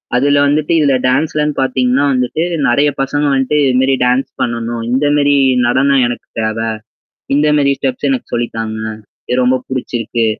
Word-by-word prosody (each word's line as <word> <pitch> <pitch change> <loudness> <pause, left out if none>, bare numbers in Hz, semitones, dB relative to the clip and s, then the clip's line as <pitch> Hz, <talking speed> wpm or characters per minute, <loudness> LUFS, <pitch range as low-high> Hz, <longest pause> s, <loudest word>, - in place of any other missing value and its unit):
அதுல 140 +3 +3
வந்துட்டு 150 +3 0
இதுல 140 -3 +3
டான்ஸ்லன்னு 150 +3 0
பாத்தீங்கன்னா 130 +1 +1
வந்துட்டு 125 +4 -1 0.3
நெறைய 140 +5 +3
பசங்க 145 +2 -1
வந்துட்டு 135 +2 0
இதுமரி 130 +1 +2
டான்ஸ் 125 +2 +1
பண்ணணும். 115 0 -3
இந்த 130 +4 +1
மாரி 145 -1 +3 0.3
நடனம் 135 +2 +2
எனக்கு 120 - -6
தேவை. 110 +1 -2 0.7
இந்த 150 +1 +2
மாரி 140 -1 +2
ஸ்டெப்ஸ் 250 - -2
எனக்கு 260 -3 -3
சொல்லி 120 0 -1
தாங்க. 110 -1 -4 0.5
இது 125 - +1
ரொம்ப 130 +1 +3
புடிச்சிருக்கு. 120 -3 -2
130 Hz, 150 wpm, -15 LUFS, 120-145 Hz, 0.7 s, அதுல